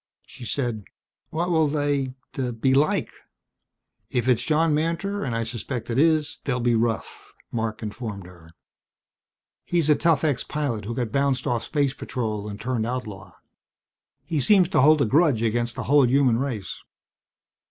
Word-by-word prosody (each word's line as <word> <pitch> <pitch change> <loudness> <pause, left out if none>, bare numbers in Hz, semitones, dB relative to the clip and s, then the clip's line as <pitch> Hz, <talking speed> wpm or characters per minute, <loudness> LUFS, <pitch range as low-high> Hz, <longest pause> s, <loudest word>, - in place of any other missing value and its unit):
She 125 - -11
said, 120 -5 -2 0.4
"What 170 +3 -1
will 160 -2 +3
they 145 -3 -1 0.4
be 130 +3 +3
like?" 145 +3 +2 1.0
"If 125 -1 -1
it's 125 -3 +3
John 160 0 +2
Mantor, 170 +6 -1
and 125 -4 -2
I 115 - 0
suspect 120 0 -5
it 115 - +1
is, 155 -1 +2
they'll 125 -3 -1
be 120 0 +2
rough," 115 0 -2 0.2
Marc 110 -1 -3
informed 105 -3 -6
her. 85 -2 -15 1.1
"He's 165 -3 +2
a - - +6
tough 165 -3 +2
ex 145 -5 +1
pilot 135 -9 -3
who 115 +2 -4
got 120 -3 -2
bounced 140 -1 +1
off 120 -2 0
Space 140 +1 0
Patrol 110 -7 -4
and 100 0 -7
turned 115 -1 -1
outlaw. 115 -6 -5 0.9
He 155 - -1
seems 185 - +4
to 190 - +3
hold 150 +1 +5
a - - +2
grudge 140 -2 +3
against 120 +1 0
the - - -4
whole 140 -1 +4
human 130 -2 +3
race. 125 -8 -4
130 Hz, 160 wpm, -24 LUFS, 115-150 Hz, 1.1 s, a